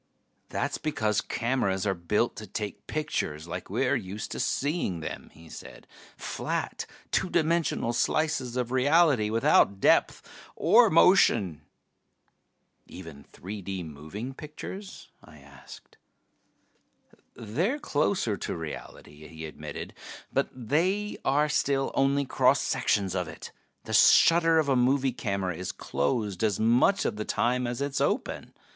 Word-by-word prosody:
"That's - - -2
because 110 -9 0
cameras 110 -6 -1
are 100 - +1
built 95 +6 -1
to 110 - -8
take 105 +2 -6
pictures 85 - -3
like 90 +2 -6
we're 125 +7 +1
used 105 -3 -5
to - - -5
seeing 140 - -1
them," 80 - -7
he 80 +1 -16
said. - - -11 0.3
"Flat, - - -4 0.2
two 185 - +1
dimensional 165 -7 +1
slices 130 0 0
of 125 -1 -2
reality, 135 -3 +3
without 110 -3 +3
depth - - +2 0.3
or - - +5
motion." 85 -6 +4 1.3
"Even 70 -3 -11
3 100 +3 -8
D 95 -1 -5
moving 80 - -7
pictures?" 160 +7 -9
I 80 -1 -15
asked. 70 -2 -15 1.4
"They're 165 - -1
closer 150 - 0
to - - -4
reality," 75 -1 -9
he 80 -1 -9
admitted. 80 - -8 0.4
"But - - +1
they 170 - -1
are 145 +3 +2
still 140 -2 0
only 140 +1 +2
cross - - +3
sections 100 -3 0
of 90 -2 -2
it. - - -9 0.3
The - - -6
shutter 165 -1 +6
of 155 -2 +2
a 135 - +2
movie 130 +1 +2
camera 100 -6 -2
is 90 +2 -4
closed 100 - -2
as 105 -3 +1
much 120 - +3
of - - -1
the 105 - -2
time 125 +3 0
as 120 +2 -4
it 140 0 -1
is 135 - -2
open. - - -2
115 Hz, 135 wpm, -27 LUFS, 95-140 Hz, 1.4 s, shutter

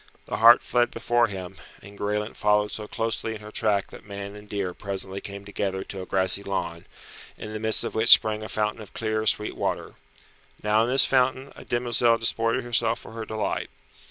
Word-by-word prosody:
The - - -4
hart 115 +2 +7
fled 120 0 +1
before 120 0 +1
him, 95 -2 -8 0.2
and 100 0 -14
Graelent 105 +2 -3
followed 105 0 +2
so 105 -1 -5
closely 115 0 -3
in 105 - -10
her 105 0 -10
track 105 -3 +1
that - - -12
man 100 0 -8
and 105 0 -13
deer 100 -3 -3
presently 100 0 -4
came 100 0 -8
together 95 -1 -3
to 95 - -6
a 95 - -8
grassy 95 +1 +2
lawn, 85 -4 -4 0.5
in 105 - -8
the 110 - -4
midst 110 0 +1
of - - -4
which 110 +1 +1
sprang 110 0 +7
a 110 - -7
fountain 105 +1 -2
of 105 - -13
clear, 110 -1 -1
sweet 105 - +2
water. - - -3 0.7
Now 105 +1 +3
in - - -3
this 135 +1 +5
fountain 130 +1 +1
a - - -11
demoiselle 120 -1 +1
disported 115 +1 +1
herself 120 -1 +1
for - - -11
her 115 0 -6
delight. 110 -1 -3
105 Hz, 200 wpm, -25 LUFS, 100-115 Hz, 0.7 s, hart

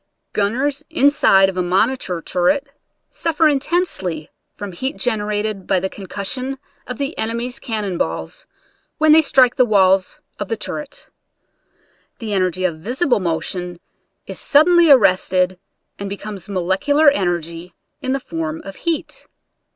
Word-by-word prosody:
Gunners 265 +8 0
inside 280 -11 +4
of 190 -1 -4
a - - +2
monitor 185 0 0
turret 185 +11 +1 0.5
suffer 325 -1 +1
intensely 275 - -1 0.2
from 205 -1 -6
heat 260 - -4
generated 210 -3 -2
by 190 - +2
the 190 +1 -3
con 195 -2 -10
cussion 255 +8 -4 0.3
of 250 - -5
the 280 +3 -3
enemies' 235 +3 -2
cannon 210 -8 -3
balls 80 0 -4 0.5
when 310 0 +4
they 320 +1 +8
strike 260 -4 +3
the 255 - +6
walls 190 -4 +2 0.2
of 205 - -3
the 225 - -2
turret. 295 +6 -6 1.1
The 220 -3 -5
en 195 - +2
ergy 185 0 0
of 160 -3 -7
visible 245 - 0
motion 175 0 -3 0.5
is - - -7
suddenly 335 +3 +5
arrested 185 -6 +4 0.4
and 200 0 -4
becomes 200 -1 -7
molecular 200 - +3
energy 175 - -3 0.3
in 260 -2 -2
the 275 - 0
form 160 -7 -4
of 195 -1 -9
heat. 335 -2 -3
205 Hz, 140 wpm, -19 LUFS, 185-270 Hz, 1.1 s, they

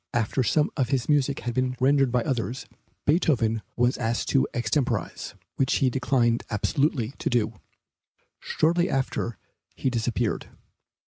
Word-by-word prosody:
After 120 +3 +1
some 150 +5 +2
of 130 -4 0
his 130 -3 0
music 140 -2 +2
had 120 0 -3
been 130 0 0
rendered 135 0 +3
by 125 -1 +1
others, 130 -1 -2 0.4
Beethoven 130 -9 +2
was 120 +1 +1
asked 115 0 -1
to 135 - +3
extemporize, 120 - -1 0.2
which 135 - +2
he 130 -2 +2
declined 120 -2 +1
absolutely 125 +2 0
to - - -1
do. 110 -4 0 0.8
Shortly 170 +3 +1
after 130 -3 -1 0.4
he 130 - -1
disappeared. 120 -1 -1
125 Hz, 135 wpm, -26 LUFS, 115-135 Hz, 0.8 s, rendered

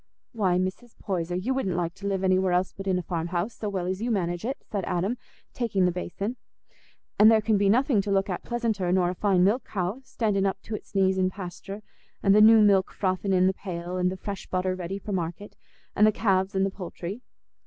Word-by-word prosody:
'" - - -57
"Why, 195 -7 +1
Mrs. 190 +6 -4
Poyser, 175 -3 -3
you 205 +9 -1
wouldn't 195 -10 -1
like 170 -1 -1
to 200 +1 -6
live 195 -1 -1
anywhere 185 -1 +2
else 180 +1 +1
but 195 0 -7
in 185 -1 +2
a 180 - -3
farm 165 -1 -3
house, 175 +6 -2
so 210 - -3
well 190 -3 -2
as 185 +2 -3
you 240 - -1
manage 175 -5 -1
it," 265 +4 -2
said 200 -3 -3
Adam, 190 +7 -1 0.4
taking 210 -6 +1
the 180 - +3
basin; 195 +6 -4 0.8
"and 215 +1 +9
there 225 -1 +6
can 220 0 +1
be 200 -1 +3
nothing 240 0 +3
to 205 - -5
look 195 0 +2
at 180 -3 -3
pleasanter 225 -7 -1
nor 180 -1 +2
a - - -4
fine 185 -1 +2
milch 215 +7 +2
cow, 195 +5 -3
standing 205 -6 0
up 195 - -2
to'ts 215 -2 -7
knees 190 -1 +3
in 185 0 +2
pasture, 195 +2 -8 0.4
and 195 - +5
the 210 - +6
new 220 +1 +8
milk 195 -2 +4
frothing 190 0 -1
in 185 -1 +4
the 190 - +3
pail, 180 -2 -5
and 180 0 +1
the 190 - -5
fresh 200 0 -6
butter 185 0 -1
ready 185 +1 -4
for 205 +1 -7
market, 180 +2 -4 0.4
and 210 - +5
the - - +5
calves, 195 -2 +1
and 190 0 +2
the 195 - -2
poultry. 190 +3 -7
195 Hz, 230 wpm, -26 LUFS, 180-210 Hz, 0.8 s, and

